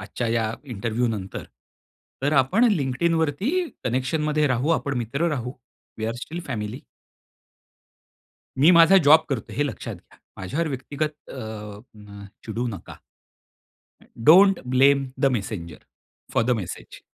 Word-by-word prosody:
आजच्या 105 Hz, +5 st, -4 dB
या 115 Hz, -1 st, 0 dB
इंटरव्ह्यू 120 Hz, -1 st, -2 dB
नंतर 100 Hz, -4 st, -5 dB, 0.8 s
तर 145 Hz, -, +1 dB
आपण 155 Hz, -, +3 dB
LinkedInवरती 160 Hz, -, 0 dB, 0.3 s
कनेक्शनमध्ये 150 Hz, +5 st, 0 dB
राहू, 130 Hz, +2 st, 0 dB
आपण 140 Hz, -4 st, 0 dB
मित्र 140 Hz, +9 st, -1 dB
राहू. 125 Hz, -5 st, -3 dB, 0.5 s
We 110 Hz, -, -3 dB
R 115 Hz, -, -2 dB
still 170 Hz, +3 st, -6 dB
family. 115 Hz, 0 st, -4 dB, 1.8 s
मी 155 Hz, +6 st, +6 dB
माझा 170 Hz, +3 st, +7 dB
जॉब 155 Hz, +2 st, +8 dB
करतोय 135 Hz, -7 st, -4 dB
हे 145 Hz, -, +2 dB
लक्षात 130 Hz, -, -6 dB
घ्या. -, -, -20 dB, 0.2 s
माझ्यावर 140 Hz, -, -2 dB
व्यक्तिगत 145 Hz, +3 st, -3 dB, 0.2 s
अ, 105 Hz, -4 st, -8 dB
म 100 Hz, -1 st, -12 dB, 0.2 s
चिडू 115 Hz, +2 st, -3 dB
नका. 95 Hz, -, -9 dB, 1.1 s
अ, -, -, -20 dB, 0.3 s
don't 195 Hz, +3 st, +7 dB
blame 135 Hz, +1 st, +4 dB
the -, -, +4 dB
messenger, 85 Hz, -7 st, -7 dB, 0.5 s
four -, -, +2 dB
the 125 Hz, -, 0 dB
message. 90 Hz, -, -9 dB
130 Hz, 130 wpm, -24 LUFS, 110-150 Hz, 1.8 s, जॉब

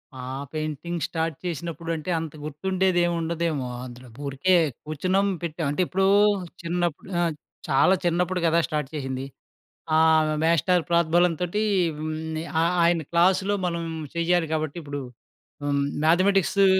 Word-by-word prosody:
ఆహ్, 130 Hz, +2 st, -5 dB
painting 155 Hz, +2 st, -3 dB
start 160 Hz, -1 st, -2 dB
చేసినప్పుడంటే 165 Hz, 0 st, -4 dB
అంత 160 Hz, -2 st, -6 dB
గుర్తుండేదేమి 175 Hz, +3 st, +1 dB
ఉండదేమో 165 Hz, -4 st, -1 dB, 0.2 s
అందులో. 125 Hz, 0 st, -11 dB, 0.2 s
ఊరికే 140 Hz, +7 st, +1 dB, 0.3 s
కూర్చున్నాం 185 Hz, +6 st, 0 dB, 0.2 s
పెట్టాం. 165 Hz, -1 st, -3 dB
అంటే 145 Hz, -, 0 dB
ఎప్పుడో 190 Hz, +1 st, +1 dB, 0.6 s
చిన్నప్పుడు 175 Hz, 0 st, -2 dB
ఆహ్, 170 Hz, -2 st, +1 dB, 0.4 s
చాలా 150 Hz, +7 st, +5 dB
చిన్నప్పుడు 180 Hz, +2 st, +1 dB
కదా! 165 Hz, +1 st, +3 dB
స్టార్ట్ 150 Hz, -4 st, -2 dB
చేసింది. 135 Hz, -2 st, -3 dB, 0.7 s
ఆహ్, 160 Hz, -1 st, +4 dB
మాస్టరూ 170 Hz, +2 st, +3 dB
ప్రోద్బలం 170 Hz, +1 st, +3 dB
తోటి 180 Hz, +5 st, 0 dB, 0.4 s
హ్మ్. 155 Hz, +1 st, -3 dB, 0.5 s
ఆహ్, 170 Hz, +1 st, +2 dB
ఆ -, -, +5 dB
ఆయన 170 Hz, -1 st, +3 dB
క్లాసులో 185 Hz, +4 st, +3 dB
మనం 170 Hz, -1 st, -1 dB, 0.3 s
చెయ్యాలి 170 Hz, -1 st, +1 dB
కాబట్టి 155 Hz, 0 st, -2 dB
ఇప్పుడు 145 Hz, -1 st, -5 dB, 0.6 s
హ్మ్, 140 Hz, 0 st, +1 dB, 0.2 s
మ్యాథమెటిక్సు 195 Hz, +3 st, +4 dB
165 Hz, 125 wpm, -25 LUFS, 155-175 Hz, 0.7 s, చాలా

